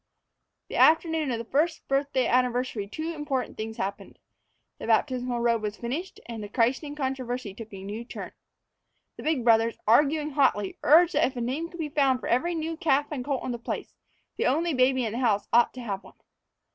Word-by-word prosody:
The - - -4
afternoon 320 -2 +4
of 240 - -1
the 230 - -6
first 310 +6 0
birthday 275 -1 +1
anniversary 250 -4 +1
two 315 +10 -4
important 285 -5 -3
things 220 0 -5
happened: 200 +1 -5 0.6
the - - -6
baptismal 250 -3 +1
robe 235 -1 +2
was 210 -1 -4
finished 280 +11 -5
and 230 -2 -6
the 205 - -7
christening 260 +6 0
controversy 255 -6 -3
took 225 +2 -10
a 195 -1 -9
new 210 +4 -5
turn. 235 - -8 0.9
The - - -8
big 305 -6 0
brothers, 230 0 +4
arguing 295 +6 +3
hotly, 260 -8 +1
urged 335 +4 +6
that - - +3
if 260 - -7
a 245 - -3
name 275 +8 -2
could 345 - -12
be 310 -2 -2
found 275 -3 +2
for - - -8
every 340 +9 +1
new 325 0 -3
calf 290 -4 +1
and 270 -4 -3
colt 275 -1 -2
on 255 - -3
the 240 - -4
place, 235 - -5 0.4
the - - +1
only 320 +6 +1
baby 255 -1 +3
in 220 - -2
the 240 - -3
house 210 -5 +1
ought 240 0 +5
to 255 - -6
have 200 -5 -4
one. - - -16
255 Hz, 200 wpm, -27 LUFS, 230-295 Hz, 0.9 s, urged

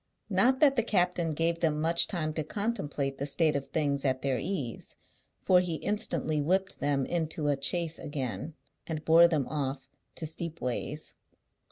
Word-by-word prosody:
Not 260 +1 +3
that 275 -3 +5
the - - +5
captain 180 -6 +1
gave 165 +2 0
them 155 -3 +1
much 165 +2 +3
time 155 -5 -2
to 155 - -1
contemplate 150 -8 -2
the 140 - -2
state 155 +1 +2
of 140 -1 -2
things 145 -3 0
at 130 -2 0
their 135 -3 0
ease, 140 - -4 0.5
for 180 -1 +5
he 180 -2 -1
instantly 160 -6 0
whipped 190 +6 0
them 140 -2 +1
into 160 -2 -1
a 140 -1 0
chaise 165 +2 0
again, 145 +1 -4 0.3
and 155 -2 -4
bore 165 +1 +7
them 155 -6 0
off 135 -2 -3 0.3
to 165 - -3
Steepways. 155 -3 -4
155 Hz, 165 wpm, -29 LUFS, 145-175 Hz, 0.5 s, bore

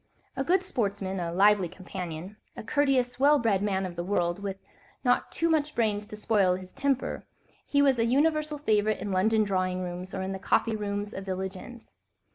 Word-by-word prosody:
A 270 - -1
good 365 +6 +2
sportsman, 200 - -2
a 170 -1 -2
lively 195 0 +4
companion, 180 0 -7 0.2
a - - -6
courteous, 255 -1 +1
well 290 +2 +6
bred 220 -6 +1
man 195 -2 0
of 180 -2 -6
the 175 - -3
world, 175 -1 0
with 195 -1 -4 0.5
not 245 -2 +2
too 330 - 0
much 305 -2 +1
brains 210 -3 0
to 210 - -8
spoil 200 -4 +2
his 185 0 -9
temper, 275 -1 -1 0.4
he 285 0 +3
was 270 -3 +3
a 230 - +3
universal 300 +4 +1
favourite 215 -6 +1
in 200 +1 -4
London 215 +4 +3
drawing 185 -2 -1
rooms 180 +2 -6
or 190 - -2
in 190 - -3
the 190 - -4
coffee 220 +3 +1
rooms 205 -1 -3
of 195 - -5
village 190 0 -3
inns. 235 +5 -12
205 Hz, 195 wpm, -28 LUFS, 185-250 Hz, 0.5 s, well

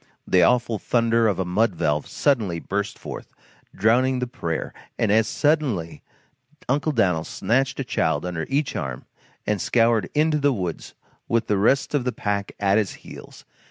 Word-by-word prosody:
The 90 - +3
awful 115 +2 +2
thunder 115 -1 +2
of 100 -4 0
a 95 - -1
mud 100 +2 +1
valve 75 -2 0
suddenly 110 - 0
burst 100 +3 -3
forth, - - -9 0.4
drowning 125 +4 +3
the 125 - -1
prayer, 85 -10 -4 0.2
and 110 - +1
as 110 +1 +4
suddenly 120 - 0 0.7
Uncle 145 +4 +1
Dan'l 90 - +1
snatched 130 +10 -1
a - - 0
child 80 - 0
under 85 -2 -3
each 140 0 0
arm 65 -3 -4 0.4
and 105 -3 0
scoured 115 -2 +2
into 155 0 +2
the 145 -1 +2
woods 90 -7 -5 0.3
with 115 0 +1
the 105 -2 +1
rest 135 +8 +2
of 145 -4 +1
the 125 - -1
pack 105 -3 -3
at 100 +1 +3
his 105 -4 -2
heels. - - -12
110 Hz, 165 wpm, -23 LUFS, 95-130 Hz, 0.7 s, as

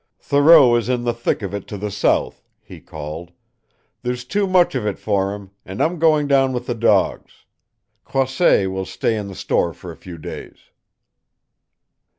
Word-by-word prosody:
"Thoreau 145 -3 +6
is 120 0 -3
in 125 -1 0
the 120 -1 0
thick 120 -1 -2
of 100 - -5
it 100 -2 -5
to 105 - -6
the 105 +1 -4
south," 100 - 0 0.2
he - - -12
called. 80 +3 -8 0.7
"There's 125 0 -4
too 200 +9 0
much 185 -2 +3
of 130 -5 -2
it 100 - -2
for 100 -1 -1
him, 100 -2 -12
and 95 +2 -8
I'm 170 +1 0
going 155 -2 +3
down 135 -2 +2
with 125 0 -4
the 120 - -2
dogs. 115 0 0 0.6
Croisset 130 - +1
will 95 0 -3
stay 115 - -1
in 105 -2 -4
the 95 - -9
store 85 -1 0
for 90 - -9
a - - -11
few 90 0 -11
days." 75 - -9
115 Hz, 175 wpm, -20 LUFS, 95-135 Hz, 0.7 s, Thoreau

